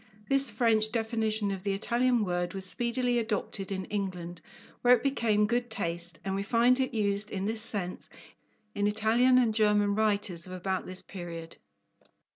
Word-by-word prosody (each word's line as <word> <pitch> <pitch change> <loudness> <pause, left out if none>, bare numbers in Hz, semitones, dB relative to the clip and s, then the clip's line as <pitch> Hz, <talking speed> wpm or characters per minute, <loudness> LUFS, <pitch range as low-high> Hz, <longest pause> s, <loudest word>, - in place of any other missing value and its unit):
This 275 0 +3
French 220 -3 +2
definition 220 -3 +1
of 195 -1 -4
the 200 0 -1
Italian 235 +2 +1
word 175 0 -2
was 190 -1 -3
speedily 240 +6 0
adopted 210 -3 -3
in 190 -1 -3
England, 180 -4 -4 0.4
where 250 0 +6
it 230 - -5
became 225 -6 +2
"good 240 +2 -1
taste," 170 -5 -2
and 190 - -2
we 195 - -1
find 235 +5 +3
it 260 - 0
used 205 -2 -1
in 195 -1 -3
this 220 +1 -1
sense 190 -4 -3 0.6
in 205 -1 0
Italian 225 +4 +3
and 240 -3 +3
German 210 -2 +3
writers 200 -5 0
of 185 - -8
about 185 +1 -3
this 185 0 -8
period. 170 -3 -8
210 Hz, 165 wpm, -29 LUFS, 190-230 Hz, 0.6 s, where